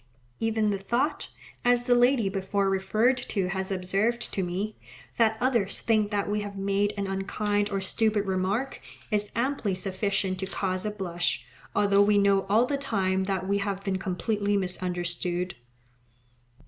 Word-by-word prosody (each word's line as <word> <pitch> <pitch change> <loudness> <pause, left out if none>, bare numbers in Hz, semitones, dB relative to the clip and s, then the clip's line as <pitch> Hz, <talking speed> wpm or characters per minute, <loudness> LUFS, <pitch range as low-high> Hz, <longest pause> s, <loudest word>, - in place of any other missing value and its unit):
Even 220 -1 +1
the 200 - -1
thought, 245 +9 -1 0.3
as 245 0 +3
the 245 - +4
lady 245 -2 +4
before 195 0 0
referred 215 +7 +2
to 195 -7 -2
has 190 +1 -2
observed 195 +6 0
to 195 - 0
me, 190 +4 -3 0.4
that 220 -1 +3
others 240 -6 +1
think 215 -2 +2
that 205 -1 -1
we 210 +1 0
have 205 -1 -6
made 200 +1 +1
an 200 - -1
unkind 205 +2 -1
or 200 -1 -1
stupid 210 +2 +1
remark, 195 +7 -1 0.3
is 210 -1 0
amply 235 -5 0
sufficient 190 0 -1
to 190 - -3
cause 185 0 -2
a - - +1
blush, 175 -4 -2 0.3
although 200 -1 +4
we 205 0 +4
know 200 -1 +3
all 220 +4 +5
the 280 +2 -1
time 190 -8 0
that 190 -1 -2
we 200 +1 +1
have 200 -1 -2
been 195 -2 -1
completely 200 +2 0
misunderstood. 180 -1 -2
200 Hz, 160 wpm, -27 LUFS, 190-215 Hz, 0.4 s, all